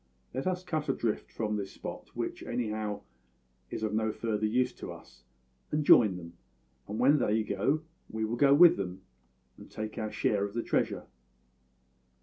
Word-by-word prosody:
Let 130 +7 -2
us 180 0 -1
cut 155 -5 -2
adrift 120 -5 -1
from 105 -1 -2
this 100 -1 -5
spot - - -8
which, - - -3
anyhow, 110 -3 -3 0.7
is - - -5
of 110 -1 -1
no 110 0 +1
further 110 -1 -1
use 125 +4 +1
to - - -6
us 60 - -14 0.4
and 150 0 0
join 105 -9 +7
them; 85 -1 -10 0.5
and 105 - -4
when 140 +5 +5
they 110 -2 +2
go, 135 +10 0 0.3
we 110 0 -2
will 110 +2 -2
go 140 +3 +4
with 165 +4 +8
them, 95 -1 -5 0.6
and - - -12
take 110 0 -5
our 110 -1 -3
share 100 -2 +1
of 100 +1 -4
the 115 - -1
treasure.' - - 0
110 Hz, 170 wpm, -30 LUFS, 105-130 Hz, 0.7 s, with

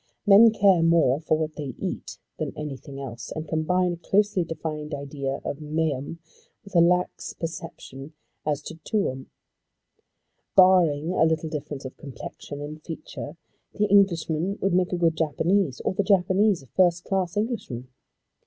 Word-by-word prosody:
Men 210 +3 +8
care 195 -5 +4
more 165 -5 +4
for 155 0 +1
what 155 -1 -3
they 140 -5 -5
eat - - -5 0.2
than - - -4
anything 140 -2 -7
else, 120 -3 -7
and 155 0 -5
combine 175 +3 +1
a - - -6
closely 195 +1 +1
defined 155 -2 -5
idea 140 -1 -4
of 145 - -4
meum 150 -1 -2 0.5
with 200 - -14
a - - +7
lax 180 +1 +1
perception 155 -3 -7 0.3
as 150 -1 -1
to - - -8
tuum 135 -12 -2 1.3
Barring 175 -5 +5
a 185 - +3
little 160 0 0
difference 150 -3 -5
of 130 - -8
complexion 145 +1 -8
and 150 +1 -7
feature 155 -1 -8 0.4
the 210 - +2
Englishman 190 -2 +2
would 195 -2 0
make 180 0 +2
a 180 - 0
good 165 -2 +2
Japanese, 160 +1 +1
or - - -1
the 190 - +1
Japanese 195 -2 +3
a - - -15
first 175 -2 +3
class 190 -2 -1
Englishman. 210 - -3
160 Hz, 155 wpm, -25 LUFS, 145-185 Hz, 1.3 s, Men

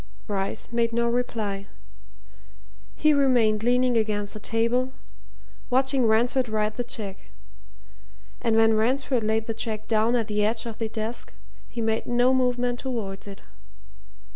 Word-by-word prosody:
Bryce 195 0 -3
made 230 -1 +1
no 235 0 +2
reply. 220 -5 -2 1.3
He 305 0 +4
remained 245 -7 +3
leaning 245 +1 +2
against 210 -2 -1
the 215 - -7
table, 235 +4 0 0.8
watching 265 -1 +3
Ransford 240 +3 +2
write 215 0 0
the 245 - -2
cheque. 205 -5 -7 1.1
And 230 -2 +1
when 225 0 +5
Ransford 245 +2 +1
laid 220 +1 0
the 225 - -2
cheque 220 -1 -4
down 225 +2 +2
at 230 -3 0
the 210 -1 0
edge 225 +3 0
of 230 -2 -7
the 225 -1 -2
desk 220 +2 -4 0.4
he 235 - -5
made 220 0 0
no 245 +2 +3
movement 245 -1 +1
towards 215 -7 -4
it. 200 -1 -10
230 Hz, 140 wpm, -25 LUFS, 215-245 Hz, 1.3 s, when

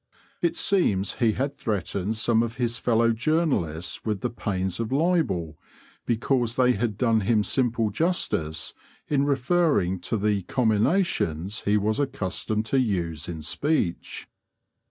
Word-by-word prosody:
It 170 - +1
seems 100 - +1
he 115 -3 +3
had 135 +4 -2
threatened 100 0 -2
some 110 +1 +2
of 115 0 -2
his 120 -2 -1
fellow 115 -1 +3
journalists 115 - -1
with 105 -3 -2
the 125 - -2
pains 95 -5 -3
of 115 0 -3
libel 135 - 0 0.5
because 120 0 +1
they 125 -1 +4
had 110 -2 -1
done 115 -2 +3
him 105 +1 +2
simple 115 -3 0
justice 100 - -1 0.4
in 140 -1 +2
referring 140 - +2
to 110 - -2
the 105 -1 +1
comminations 110 - 0
he 105 +1 +3
was 105 +3 0
accustomed 110 -5 -2
to 135 +4 +1
use 85 - -1
in 80 -3 -6
speech. 140 - -2
110 Hz, 135 wpm, -25 LUFS, 95-130 Hz, 0.5 s, they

